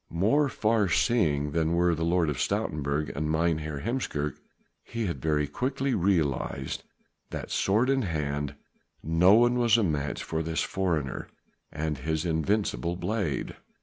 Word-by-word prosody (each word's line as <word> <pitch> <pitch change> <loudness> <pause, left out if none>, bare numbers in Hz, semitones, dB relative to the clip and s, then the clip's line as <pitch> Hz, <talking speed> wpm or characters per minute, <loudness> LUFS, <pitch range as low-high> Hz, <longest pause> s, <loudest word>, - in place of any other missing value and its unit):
More 115 - +2
far 110 -5 +1
seeing 75 - +2
than 80 +1 +1
were 85 0 +3
the 80 0 -2
Lord 85 -2 +2
of 70 - -4
Stoutenburg 75 +2 -1
and 75 +2 -1
Mynheer 80 -2 0
Heemskerk, 80 - -2 0.5
he 115 -1 -3
had 85 - -3
very 75 -2 +1
quickly 135 - -1
realized 80 - 0 0.5
that - - -6
sword 110 +6 +2
in 135 0 +2
hand 75 - -2 0.5
no 85 +5 +5
one 120 +2 +4
was 120 -1 +4
a 115 - +2
match 75 -5 -1
for 80 0 -2
this 80 0 -1
foreigner 80 -8 -2 0.4
and 80 -2 -3
his 80 +4 -2
invincible 85 +1 0
blade. 100 -5 -2
85 Hz, 145 wpm, -28 LUFS, 75-105 Hz, 0.5 s, no